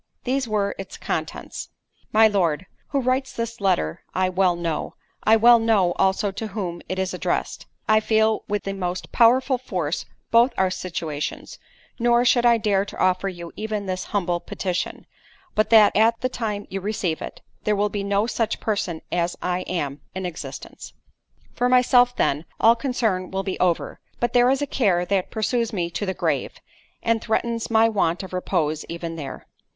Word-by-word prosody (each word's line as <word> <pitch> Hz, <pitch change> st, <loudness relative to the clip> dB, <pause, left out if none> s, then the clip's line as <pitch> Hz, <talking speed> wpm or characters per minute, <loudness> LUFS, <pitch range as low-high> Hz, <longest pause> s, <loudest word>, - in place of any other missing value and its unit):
These 260 Hz, 0 st, 0 dB
were 205 Hz, -2 st, 0 dB
its 195 Hz, -, -7 dB
contents: -, -, -4 dB, 0.4 s
"My 220 Hz, +1 st, +6 dB
Lord, 185 Hz, -5 st, +1 dB, 0.2 s
"Who 280 Hz, -, 0 dB
writes 260 Hz, +1 st, 0 dB
this 230 Hz, -1 st, -4 dB
letter 80 Hz, -, +1 dB
I 185 Hz, 0 st, +2 dB
well 185 Hz, -1 st, +2 dB
know—I 170 Hz, +5 st, -1 dB
well 235 Hz, +1 st, +7 dB
know 215 Hz, -6 st, +3 dB
also 195 Hz, +1 st, +2 dB
to 220 Hz, +3 st, -5 dB
whom 185 Hz, -4 st, -4 dB
it 185 Hz, -, -2 dB
is 190 Hz, 0 st, -1 dB
addressed—I 215 Hz, 0 st, -1 dB
feel 220 Hz, 0 st, +2 dB
with 205 Hz, -1 st, -1 dB
the 195 Hz, -, -3 dB
most 180 Hz, -2 st, -4 dB
powerful 255 Hz, +2 st, +4 dB
force 180 Hz, -, -3 dB, 0.2 s
both 235 Hz, +2 st, +5 dB
our 190 Hz, -1 st, +2 dB
situations; 160 Hz, -5 st, -4 dB, 0.4 s
nor 240 Hz, +1 st, +3 dB
should 240 Hz, -1 st, +4 dB
I 235 Hz, -1 st, +5 dB
dare 205 Hz, -3 st, +1 dB
to 200 Hz, -, -9 dB
offer 185 Hz, +1 st, +2 dB
you 170 Hz, -2 st, -8 dB
even 215 Hz, -1 st, -3 dB
this 185 Hz, -1 st, -3 dB
humble 175 Hz, -4 st, -1 dB
petition, 180 Hz, 0 st, -4 dB, 0.5 s
but 215 Hz, -, +1 dB
that 220 Hz, -2 st, +6 dB
at 225 Hz, +2 st, +3 dB
the 255 Hz, -, 0 dB
time 210 Hz, -5 st, -3 dB
you 195 Hz, 0 st, -3 dB
receive 190 Hz, -5 st, -2 dB
it, -, -, -7 dB, 0.2 s
there 210 Hz, -, +2 dB
will 205 Hz, +1 st, +1 dB
be 205 Hz, -1 st, -3 dB
no 200 Hz, +1 st, +1 dB
such 225 Hz, -1 st, -1 dB
person 195 Hz, -6 st, -2 dB
as 175 Hz, 0 st, 0 dB
I 180 Hz, 0 st, -1 dB
am, 145 Hz, -6 st, -3 dB
in 190 Hz, 0 st, -3 dB
existence. 175 Hz, -2 st, -8 dB, 0.6 s
"For 245 Hz, 0 st, +1 dB
myself, 250 Hz, -1 st, +5 dB
then, 145 Hz, +4 st, 0 dB
all 230 Hz, +1 st, +6 dB
concern 225 Hz, -7 st, -1 dB
will 190 Hz, 0 st, -2 dB
be 190 Hz, -1 st, -4 dB
over—but 185 Hz, +6 st, -1 dB
there 245 Hz, 0 st, +5 dB
is 270 Hz, +2 st, +1 dB
a -, -, +1 dB
care 195 Hz, -10 st, +1 dB
that 190 Hz, -1 st, 0 dB
pursues 230 Hz, +1 st, 0 dB
me 175 Hz, -5 st, -2 dB
to 205 Hz, +4 st, -3 dB
the 190 Hz, -, -2 dB
grave, -, -, -1 dB, 0.5 s
and 230 Hz, -1 st, +1 dB
threatens 230 Hz, +1 st, -1 dB
my 225 Hz, 0 st, +5 dB
want 195 Hz, -5 st, 0 dB
of 190 Hz, -, -9 dB
repose 160 Hz, -4 st, -1 dB
even 170 Hz, 0 st, -5 dB
there. 145 Hz, -4 st, -7 dB
200 Hz, 175 wpm, -23 LUFS, 180-230 Hz, 0.6 s, well